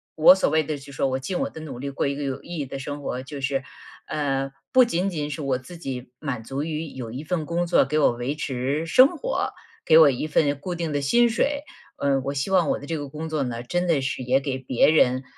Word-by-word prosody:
我 160 +4 +8
所 190 - +1
谓 155 0 +3
的， 150 0 -3
就 140 0 -12
说 135 - 0
我 130 0 0
尽 155 +8 -3
我 - - -1
的 - - -10
努 135 -6 -7
力 140 +2 -4
过 140 - -2
一 140 - 0
个 145 - -5
有 135 -1 -3
意 175 0 -7
义 140 - -3
的 135 - -6
生 145 +2 -6
活， 130 -2 -4
就 140 +1 -8
是， 135 0 -1 0.4
呃， 135 -2 -1 0.2
不 255 -1 +6
仅 190 -3 0
仅 150 -5 -3
是 155 - -5
我 135 -3 0
自 130 +8 -11
己 130 -7 -6
满 125 -7 -4
足 135 +4 -4
于 160 0 -3
有 125 -5 -7
一 130 +5 -6
份 160 -1 -2
工 170 +1 0
作 175 - +4
给 150 +3 -1
我 150 - +4
维 120 +4 -3
持 140 +2 -2
生 260 - +5
活， - - -2 0.3
给 160 - +6
我 155 -3 +8
一 135 +4 -3
份 145 -2 +1
固 180 +4 -4
定 165 -3 -3
的 145 - 0
薪 235 +13 +4
水。 285 +5 0 0.3
呃， 140 -1 +1
我 140 - -1
希 135 +7 -2
望 180 -5 +3
我 - - +1
的 145 - -9
这 165 - -3
个 145 -2 -5
工 155 +3 -6
作 155 -2 -1
呢， 120 -3 -3
真 175 +7 -1
的 155 -5 +2
是 130 0 -3
也 130 +2 +2
给 135 -1 -3
别 130 +2 +3
人， 130 -4 +3
145 Hz, 280 characters per minute, -24 LUFS, 135-160 Hz, 0.4 s, 我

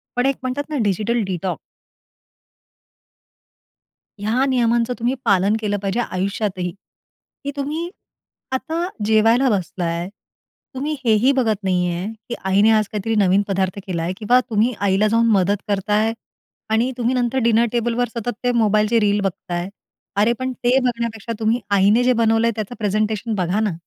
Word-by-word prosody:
पण 245 +1 +1
एक 275 0 +2
म्हणतात 280 +4 -3
ना 300 - -2
डिजिटल 215 +4 0
डिटॉक्स. 185 -1 -3 2.6
ह्या 225 +6 +1
नियमांचं 240 -2 +1
तुम्ही 240 +3 +1
पालन 200 +2 +3
केलं 205 -1 -1
पाहिजे 200 +4 -1
आयुष्यात 195 -1 -2
ही 180 0 -2 0.7
की 285 - -3
तुम्ही 300 +5 -3 0.6
आता 325 +6 -2 0.2
जेवायला 225 +4 +4
बसला 185 -3 -2
आहे, 170 +1 -2 0.7
तुम्ही 290 +4 -2
हे 225 - +4
ही 270 - +6
बघत 220 -5 +1
नाही 180 -2 +1
आहे 180 +3 -3 0.2
की 240 - -2
आईने 200 +3 +4
आज 215 -2 +3
काहीतरी 220 +1 -2
नवीन 190 +1 +3
पदार्थ 190 -1 -1
केला 170 -3 -2
आहे 175 +2 -2
किंवा 240 +4 +3
तुम्ही 225 +3 +2
आईला 200 +1 +2
जाऊन 230 +2 +3
मदत 200 0 +3
करता 205 0 -1
आहे 220 +2 +2 0.6
आणि 235 +4 +2
तुम्ही 245 +1 0
नंतर 245 +1 0
डिनर 230 0 +4
टेबलवर 240 +1 0
सतत 240 +2 -2
ते 245 - +2
मोबाईलचे 215 -1 +3
रील 205 -1 +2
बघता 195 -1 -4
आहे. 175 +2 -2 0.5
अरे! 210 +4 +3
पण 260 0 -2
ते 250 +1 +1
बघण्यापेक्षा 235 -3 -2
तुम्ही 225 +2 +1
आईने 200 +4 +4
जे 255 +1 +4
बनवलं 225 0 +2
आहे, - - +2
त्याचं 215 +2 -5
प्रेझेंटेशन 215 +1 -1
बघा 185 +1 0
ना. 215 -4 0
220 Hz, 165 wpm, -21 LUFS, 200-240 Hz, 2.6 s, ही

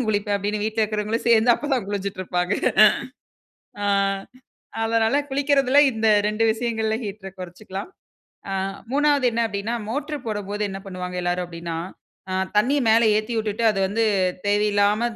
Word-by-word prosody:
நானும் 250 - 0
குளிப்பேன். 205 -1 0
அப்டின்னு 205 +1 -2
வீட்ல 220 0 0
இருக்கிறவங்களும் 215 +1 -2
சேந்து, 230 +1 +5
அப்பதான் 270 -8 -2
குளிஞ்சிட்டு 200 -1 -4
இருப்பாங்க. 180 +1 -1 1.3
ஆ. - - +1 1.0
அதனால, 225 +3 +2
குளிக்கிறதில, 275 -1 +2
இந்த 220 0 -1 0.2
2 215 +2 0
விஷயங்கள்ல, 220 -1 -1
ஹீட்டர 195 -1 -6
கொறைச்சுக்கலாம். 190 - -7 0.6
ஆ - - -2 0.4
3வது 285 -1 +2
என்ன 235 +1 0
அப்டின்னா, 205 +2 -3
மோட்ரு 290 +4 -3
போடும்போது 205 0 -3
என்ன 195 0 -6
பண்ணுவாங்க 180 -1 -6
எல்லாரும் 175 0 -1
அப்டின்னா? 170 -1 -6 0.5
ஆ, - - -2 0.2
தண்ணிய 270 +7 +3
மேல 225 +1 +5
ஏத்திவுட்டுட்டு, 220 0 -2
அது 195 - -3
வந்து 225 +3 0 0.4
தேவையில்லாம, 205 +1 +2
215 Hz, 135 wpm, -23 LUFS, 200-230 Hz, 1.3 s, சேந்து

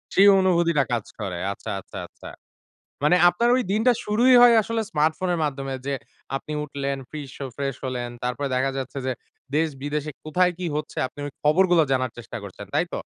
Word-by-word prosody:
সেই 195 +1 +7
অনুভূতিটা 170 -5 +3
কাজ 115 -3 -1
করে। 90 -3 -3 0.2
আচ্ছা, - - -7
আচ্ছা, 100 - -11
আচ্ছা। - - -12 0.8
মানে 165 +4 +5
আপনার 235 +6 +1
ওই 255 - +2
দিনটা 225 +4 +4
শুরুই 240 +5 +4
হয় 240 -1 +8
আসলে 230 +1 -2
স্মার্টফোনের 160 +3 +1
মাধ্যমে 135 -2 -3
যে 140 - 0 0.4
আপনি 150 - -6
উঠলেন, 140 -1 -3
ফিশ 145 -4 -7
অ - - -3
ফ্রেশ 140 -1 -2
হলেন, 125 -2 -3 0.2
তারপরে 125 +3 -2
দেখা 135 +1 +1
যাচ্ছে 135 +1 -5
যে 130 - +1 0.4
দেশ 160 +1 +2
বিদেশে 150 +1 -2
কোথায় 180 +4 +2
কি 180 - -3
হচ্ছে 150 - -5
আপনি 145 - -11
ওই 145 - -7
খবরগুলো 175 +3 +4
জানার 130 -1 +1
চেষ্টা 120 - -7
করছেন। - - -9
তাই - - +2
তো? - - -2
150 Hz, 185 wpm, -24 LUFS, 135-180 Hz, 0.8 s, হয়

